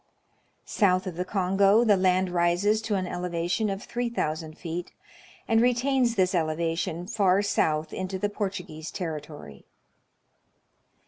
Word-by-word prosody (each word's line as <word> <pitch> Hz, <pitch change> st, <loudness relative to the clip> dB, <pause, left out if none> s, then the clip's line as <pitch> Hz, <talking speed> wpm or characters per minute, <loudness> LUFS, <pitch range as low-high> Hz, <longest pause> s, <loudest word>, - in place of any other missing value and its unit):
South 185 Hz, -2 st, +2 dB
of 185 Hz, -3 st, -5 dB
the 180 Hz, -, -2 dB
Kongo 195 Hz, +3 st, +3 dB
the 215 Hz, -3 st, +5 dB
land 185 Hz, -1 st, +2 dB
rises 175 Hz, +5 st, +2 dB
to 215 Hz, -2 st, -1 dB
an 190 Hz, -1 st, -1 dB
elevation 175 Hz, +4 st, -2 dB
of 195 Hz, 0 st, -4 dB
3 240 Hz, 0 st, -3 dB
000 155 Hz, -7 st, -3 dB
feet, 170 Hz, +2 st, -6 dB, 0.5 s
and 225 Hz, 0 st, +3 dB
retains 245 Hz, 0 st, +2 dB
this 185 Hz, -2 st, +2 dB
elevation 165 Hz, +1 st, -1 dB
far 200 Hz, -2 st, +2 dB
south 155 Hz, -6 st, 0 dB
into 185 Hz, 0 st, -3 dB
the 205 Hz, -, 0 dB
Portu 200 Hz, -3 st, -3 dB
guese 155 Hz, 0 st, -8 dB
territory. 150 Hz, -, -7 dB
185 Hz, 135 wpm, -26 LUFS, 170-205 Hz, 0.5 s, the